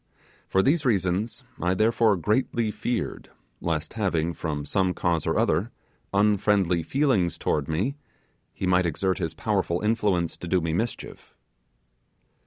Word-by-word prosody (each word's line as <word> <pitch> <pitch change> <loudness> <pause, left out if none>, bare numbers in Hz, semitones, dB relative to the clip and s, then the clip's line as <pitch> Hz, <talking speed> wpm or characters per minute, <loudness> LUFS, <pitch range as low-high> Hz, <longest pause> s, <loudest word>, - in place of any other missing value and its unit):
For 95 - +2
these 150 +3 +2
reasons, 105 - 0 0.2
I 90 +2 +1
therefore 110 0 +3
greatly 110 +3 0
feared 120 +2 -3 0.3
lest 80 -1 -2
having, 85 -6 0
from 75 -3 -4
some 95 +3 0
cause 85 -3 0
or - - +1
other, 90 +9 +1 0.4
unfriendly 100 -3 +2
feelings 120 - +1
towards 70 -2 -1
me, 95 - 0 0.6
he - - -4
might 90 -1 +3
exert 95 +3 -1
his 80 0 -3
powerful 95 -5 0
influence 105 -6 +1
to 90 - -7
do 90 +1 +2
me 80 -1 -2
mischief. 110 +7 -4
95 Hz, 135 wpm, -26 LUFS, 85-110 Hz, 0.6 s, therefore